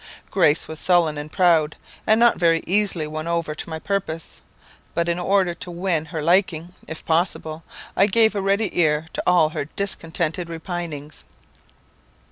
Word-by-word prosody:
Grace 150 +2 +3
was 160 0 -6
sullen 175 -4 +3
and 150 +1 -7
proud, 165 -4 +3 0.3
and 220 +1 +5
not 240 0 +4
very 165 -2 +3
easily 190 -4 +2
won 155 +1 -5
over 170 -2 -1
to 155 - -7
my 160 - -4
purpose; 165 -3 -4 0.5
but 170 0 0
in 170 +1 0
order 185 -1 +2
to 180 +1 -8
win 175 -2 -1
her 160 -2 -5
liking, 175 0 +1
if 160 - -8
possible, 160 -1 -1 0.3
I 195 - +4
gave 220 +1 +4
a 200 - -2
ready 200 +1 0
ear 155 -2 +2
to - - -2
all 175 -3 +5
her 150 - -4
discontented 170 -1 -3
repinings. 165 -3 -6
170 Hz, 160 wpm, -22 LUFS, 160-185 Hz, 0.5 s, and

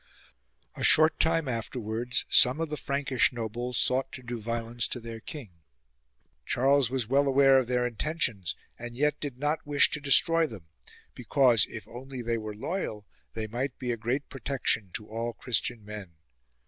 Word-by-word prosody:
A - - -7
short 155 +1 +6
time 165 -2 +2
afterwards 115 -1 -2
some 125 +5 +5
of 165 -1 -2
the 150 - -3
Frankish 140 -2 +1
nobles 120 +1 -4
sought 130 +1 +1
to 130 - -8
do 120 -1 -6
violence 115 +1 -2
to 125 - -5
their 115 -1 -8
king. 110 - -10 0.8
Charles 135 - +2
was 130 -3 -1
well 140 +3 +2
aware 135 0 +5
of 130 - -2
their 125 0 0
intentions, 120 - -2 0.2
and 120 0 -7
yet 150 +1 +1
did 140 -4 -5
not 150 +3 -1
wish 145 -1 +4
to 150 - -3
destroy 160 +4 +4
them; 100 - -11 0.5
because, 125 -6 +3
if 110 -3 -9
only 125 +2 -8
they 115 0 -1
were 110 -1 -6
loyal, 110 - -4 0.3
they 110 -1 -3
might 125 +5 -4
be 125 -2 -3
a - - -1
great 120 +6 -2
protection 130 -7 -1
to 105 - -4
all 115 +2 -4
Christian 115 -2 -2
men. 105 -5 -9
125 Hz, 170 wpm, -28 LUFS, 115-140 Hz, 0.8 s, short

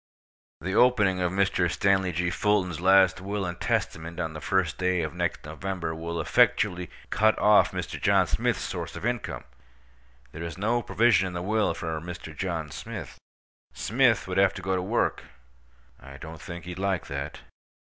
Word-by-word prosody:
The 95 +3 -3
opening 105 -6 +4
of 90 -1 +1
Mr. 95 -2 +1
Stanley 95 +1 +2
G. 90 +1 -1
Fulton's 95 -5 0
last 95 -1 +5
will 100 +1 -3
and 85 -1 -5
testament 85 +2 -2
on 80 -2 -2
the 75 - -7
first 95 -6 0
day 90 -2 +1
of 80 - -4
next - - -2
November 85 +1 -4
will 85 +1 -4
effectually 90 +2 +2 0.2
cut 110 0 +3
off 105 0 +5
Mr. - - -5
John - - +4
Smith's - - 0
source - - -5
of - - -6
income. 120 -2 -2 0.9
There 80 - -8
is 85 0 -5
no 115 +5 +1
provision 115 -4 +3
in 90 - -6
the 90 0 -4
will 105 +2 +1
for 80 -3 -4
Mr. 85 -2 -8
John 80 -4 -3
Smith. - - -7 0.5
Smith 115 -6 +2
would 95 0 0
have 95 0 +4
to 95 - -7
go 95 0 0
to 90 - 0
work. 105 +6 0 0.7
I 70 0 -12
don't 80 +1 -9
think 85 +2 -8
he'd 90 0 -7
like 95 -2 -1
that. 70 +2 -5
90 Hz, 175 wpm, -27 LUFS, 85-100 Hz, 0.9 s, last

